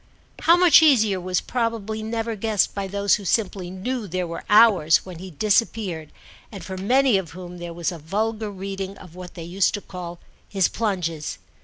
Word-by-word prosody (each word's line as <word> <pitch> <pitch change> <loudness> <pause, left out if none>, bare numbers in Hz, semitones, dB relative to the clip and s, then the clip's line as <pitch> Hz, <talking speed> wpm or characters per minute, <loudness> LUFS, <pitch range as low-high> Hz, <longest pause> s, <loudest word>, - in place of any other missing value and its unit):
How 335 +2 +5
much 355 -3 +7
easier 220 -11 +4
was 180 0 -1
probably 225 -3 -2
never 225 +1 -3
guessed 215 -1 0
by 200 -1 -3
those 200 0 +2
who 205 - -10
simply 190 -2 -1
knew 210 +5 -4
there 185 0 -2
were 170 0 -6
hours 205 -7 +5
when 180 -3 -9
he 185 +1 -8
disappeared 195 -3 0 0.4
and 195 -6 -9
for 190 - -6
many 245 +3 +3
of 170 -4 -8
whom 180 0 -9
there 175 0 -6
was 170 +1 -2
a 170 - -8
vulgar 215 +7 -2
reading 195 0 -6
of 180 -3 -14
what 180 0 -10
they 170 - -7
used 185 +5 +1
to 205 - -6
call 175 -2 -8 0.3
his 195 -3 +2
plunges. 175 -8 -2
195 Hz, 185 wpm, -23 LUFS, 180-220 Hz, 0.4 s, much